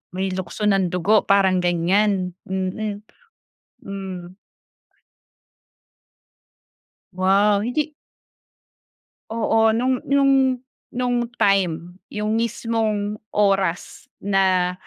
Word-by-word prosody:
May 190 0 -1
lukso 185 +3 -5
ng 195 -3 +3
dugo 195 +5 +2
parang 190 -2 +4
ganiyan, 180 +2 +1 0.2
mm. 200 +2 -3 0.8
Hmm. 185 -2 -7 2.8
Wow 200 +2 +3
hindi 300 +6 -2 1.4
Oo, 225 -1 +2
no'ng 255 +2 +1
no'ng 275 -1 +3 0.4
no'ng 245 -1 0
time, 180 -3 0
'yong 210 +1 -1
mismong 220 -2 -1 0.2
oras, 195 -4 0 0.2
na 190 -2 +2
200 Hz, 75 wpm, -22 LUFS, 185-225 Hz, 2.8 s, parang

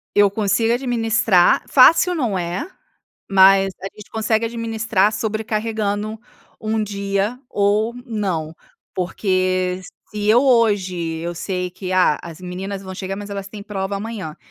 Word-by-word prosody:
Eu 205 -1 +5
consigo 220 +3 +1
administrar, 225 -7 +2
fácil, 335 +7 +6
não 240 - -1
é. 180 - -3 0.6
Mas 195 0 +6
a 195 - -6
gente 210 - -13
consegue 220 0 0
administrar 225 -3 0
sobrecarregando 215 -1 -2 0.4
um 220 0 -1
dia 200 +3 -2
ou 210 +1 +1
não, 185 -8 -3 0.4
porque 185 0 0 0.3
eu 215 +4 +3
hoje 190 -10 +1
sei 180 +1 -3
que, 185 +1 -6
ah, 180 -5 +3
as 170 0 -10
meninas 190 +2 -5
vão 190 -1 -8
chegar, 190 0 -5
mas 205 0 -7
elas 195 -1 -5
têm 205 0 -9
prova 200 -1 -3
amanhã, 200 -7 -6
205 Hz, 130 wpm, -20 LUFS, 185-220 Hz, 0.6 s, fácil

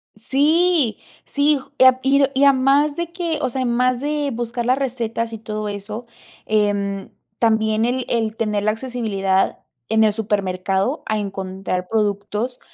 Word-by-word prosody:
Sí, 290 - +2 0.3
sí, 290 0 +2
ju - - -16
y - - +5
ap 260 0 +6
y 275 +1 +4
r 275 0 +2
y 270 +2 +2
a - - +8
demás 280 +3 +3
de 340 -1 -4
que, 340 -3 -2
o 255 - 0
sea, 260 +2 -3
además 250 0 +1
de 290 0 -1
buscar 240 0 -3
las 255 +2 +3
recetas 230 -4 -2
y - - -4
todo 215 -1 -4
eso, 210 +3 -6 0.4
em, 205 -2 0 0.3
también 220 -1 +2
el 250 +1 0
el 225 -2 -1
tener 210 -2 -1
la 215 - +3
accesibilidad 215 -6 -1 0.3
en 220 0 +4
el 210 - +2
supermercado 195 - -1
a 215 0 -1
encontrar 190 -2 -4
productos 210 +3 -1
230 Hz, 165 wpm, -21 LUFS, 210-265 Hz, 0.4 s, a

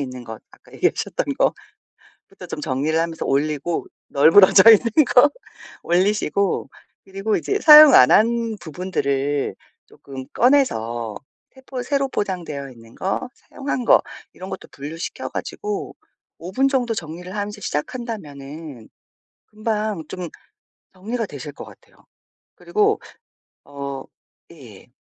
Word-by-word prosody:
있는 130 -3 -6
것 110 -2 -9
아까 - - -21
얘기하셨던 - - -1
거 - - +3 0.8
부터 - - -12
좀 - - -6
정리를 150 +2 -1
하면서 165 0 -3
올리고 150 +4 -1 0.2
널브러져 175 +9 +7
있는 230 +6 +4
거 275 +4 +7 0.5
올리시고 195 +1 0 0.3
그리고 195 +3 -2
이제 405 +1 -2
사용 305 -3 +10
안 125 - +7
한 230 0 +3
부분들을 145 -5 -2 0.3
쪼끔 135 -1 -10
꺼내서 120 - +1 0.4
새 265 - -17
포 255 -2 -5
새로 275 +1 0
포장되어 165 - -4
있는 115 -1 -17
거, 195 +6 -3
사용한 265 -3 -5
거 - - +6 0.3
이런 185 +1 -9
것도 190 - -8
분류시켜 155 +5 -6
가지고 415 -1 -5 0.4
5 175 +2 -8
분 265 +7 +2
정도 250 -4 0
정리를 175 0 -7
하면서 210 0 -5
시작한다면은 150 - -6 0.6
금방 215 -4 -3
좀 180 -2 -6 0.7
정리가 225 +5 -4
되실 145 -3 -8
것 - - -10
같아요. - - -18 0.6
그리고 425 0 +1 0.7
어 140 -1 -6 0.5
예. - - -15
185 Hz, 265 characters per minute, -21 LUFS, 145-230 Hz, 0.8 s, 사용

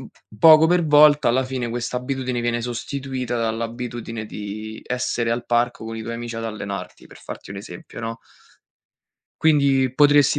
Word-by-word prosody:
mhmm, - - -10 0.3
poco 160 +3 +8
per 175 0 +3
volta, 150 -2 +6
alla 130 +2 +2
fine, 130 -2 -3
quest'abitudine 125 +1 -3
viene 120 0 -1
sostituita 125 0 -4
dall'abitudine 115 0 -4
di 110 +2 -7
essere 125 -2 -1
al 120 0 -3
parco 120 -1 0
con 115 0 -6
i 110 - -5
tuoi 115 +1 -5
amici 120 0 -6
ad 115 - -4
allenarti, 100 -4 -6
per - - -15
farti - - -9
un 100 - -6
esempio, 95 +1 -9
no. 115 0 -5 1.2
Quindi 140 -4 +3
potresti 145 0 +5
120 Hz, 155 wpm, -22 LUFS, 115-135 Hz, 1.2 s, poco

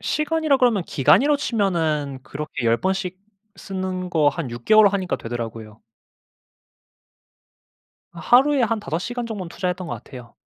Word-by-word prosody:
시간이라 305 -1 +1
그러면 240 -7 +2
기간이라 265 - +3
치면은 160 - -1
그렇게 145 -3 -6
10 115 0 +3
번씩 190 -1 -2 0.4
쓰는 185 -2 -5
거 155 -4 +3
한 145 -2 -4
6 120 0 -8
개월 215 -1 +6
하니까 190 -2 -2
되더라고요. 115 -2 -7 2.3
아 170 - -11
하루에 265 - +4
한 225 -1 0
5 165 -6 -3
시간 245 +5 -4
정도는 200 -6 -6
투자했던 180 +1 -3
것 - - -4
같아요. 125 -2 -12
185 Hz, 290 characters per minute, -22 LUFS, 145-220 Hz, 2.3 s, 개월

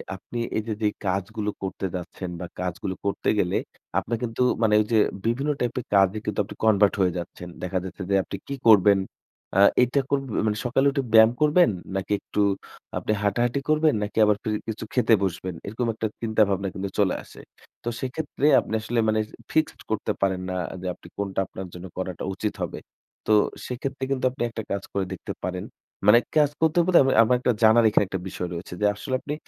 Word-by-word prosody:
আপনি 120 +5 -7 0.2
এইযে 110 0 -2
যে - - +4 0.2
কাজগুলো 100 +3 -1
করতে 95 0 -3
যাচ্ছেন, 90 +1 -6
বা 90 - -4 0.2
কাজগুলো 90 +1 -3
করতে 100 - 0
গেলে 90 - +1 0.4
আপনার 115 - -3
কিন্তু 115 0 -3 0.2
মানে 110 -1 +3
ওইযে, 110 +1 +1 0.3
বিভিন্ন 135 +6 +1
টাইপ 120 -1 -1
এর 125 - -7
কাজে 95 +1 +4
কিন্তু 105 - -2
আপনি 100 - -10
কনভার্ট 105 -2 +5
হয়ে 90 -1 +3
যাচ্ছেন। 90 0 -7
দেখা 90 0 -1
যাচ্ছে 95 +1 -8
যে 100 - +3
আপনি - - -6
কি 140 - -3
করবেন? 100 -2 +7 0.6
আ - - +5 0.2
এইটা 125 +3 +1
কোর 140 - +2
ব্যা - - 0
মানে 105 0 0
সকালে 130 +3 +2
উঠে 140 -1 -1
ব্যায়াম 110 0 +8
করবেন? 150 +2 +5 0.3
নাকি 95 +1 -3
একটু 105 - -2 0.6
আপনি - - -2
হাঁটাহাঁটি 120 +5 +1
করবেন? 155 0 +4
নাকি 105 - -6
আবার 105 -1 +3
ফির 110 - -1 0.2
কিছু 110 - -4
খেতে 125 -2 +3
বসবেন? 95 -1 -3
এরকম 115 +4 -2
একটা 110 0 -2
চিন্তাভাবনা 105 -4 +2
কিন্তু 100 +1 -4
চলে 100 -3 +3
আসে। - - -14 0.4
তো 120 - -1
সেক্ষেত্রে, 140 +2 -3
আপনি - - -6
আসলে 115 +2 -1
মানে 110 0 +2
এইযে 105 - -15 0.2
ফিক্সড 155 -1 0
করতে 110 - 0
পারেন 95 -1 +1
না 90 - -3 0.3
যে - - -8
আপনি 85 - -15
কোনটা 100 -1 -2
আপনার 95 0 -7
জন্য 90 +1 -8
করাটা 95 -2 -4
উচিত 105 +2 -2
হবে? - - -4 0.5
তো 110 - +4 0.3
সেক্ষেত্রে 135 +2 -4
কিন্ত 135 -2 -1
আপনি 130 -1 -4
একটা 115 -1 -5
কাজ 100 -1 -2
করে 100 -1 0
দেখতে - - -6
পারেন। 90 0 -3 0.4
মানে 115 +3 +8 0.2
কাজ 150 -2 +5
করতে 160 +1 +2
বলতে 180 -1 +6
আমি 135 - +3
আমার 125 +2 +3
একটা 125 - +2
জানার 110 +2 +7
এইখানে 105 - +3
একটা 95 0 -3
বিষয় 90 -1 -4
রয়েছে 85 +1 -7
যে, - - +3
আসলে 130 +5 -3
আপনি 145 - -4
110 Hz, 195 wpm, -25 LUFS, 95-120 Hz, 0.6 s, ব্যায়াম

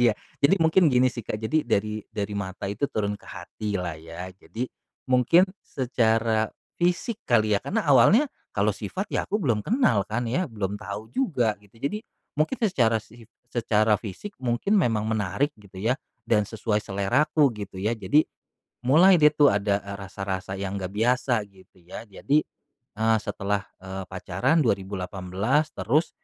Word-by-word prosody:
iya, 120 -2 +5 0.3
jadi 145 +8 +5
mungkin 165 +1 +5
gini 125 +1 +5
sih, 120 - -7
Kak. - - -2
Jadi 155 +8 +1
dari 105 +1 0
dari 105 0 -3
mata 100 -1 -4
itu 105 +8 -1
turun 105 -1 -1
ke - - -20
hati 105 +4 -6
lah, 85 -2 -3
ya. 85 +3 -8
Jadi, 115 +6 -5 0.4
mungkin 130 +8 +5 0.2
secara 115 -3 +1 0.3
fisik 180 +6 0
kali 110 -3 +3
ya, - - -22
karena 225 +2 -1
awalnya 145 - +6 0.3
kalau 105 +1 +2
sifat, 185 - -4
ya, - - 0
aku 210 - 0
belum 115 -6 +1
kenal, 205 - +3
kan, 120 +3 -1
ya, 180 +9 0
belum 105 -2 -3
tahu 105 +2 -7
juga 125 - +1
gitu. 105 +2 -23
Jadi, 175 +10 -1 0.4
mungkin 155 +12 +1
secara 115 - +2
sif 115 +1 -16 0.2
secara 110 -3 +2
fisik 120 - -7
mungkin 130 - +1
memang 115 - +2
menarik 110 +6 0
gitu 100 -2 -16
ya, 115 +8 0 0.3
dan 105 -3 +2
sesuai 110 0 -1
seleraku 140 +10 +2
gitu 100 -2 -8
ya. 105 +3 +1
Jadi, 110 +8 +3 0.6
mulai 175 +7 +7
deh, 150 0 +7
tuh, 145 -1 +6
ada, 100 0 +1
eee, 100 0 -6
rasa-rasa 95 -1 -4
yang 100 0 -3
gak 90 -1 -4
biasa 120 +1 +2
gitu 95 -1 -21
ya. 95 +6 -9
Jadi, 135 +9 +1 0.6
eee, 110 +1 +3
setelah, 100 0 -2 0.2
eee, 95 0 -6
pacaran 130 - 0
2018 95 - -1
terus 150 +9 +1
110 Hz, 160 wpm, -25 LUFS, 100-140 Hz, 0.6 s, mulai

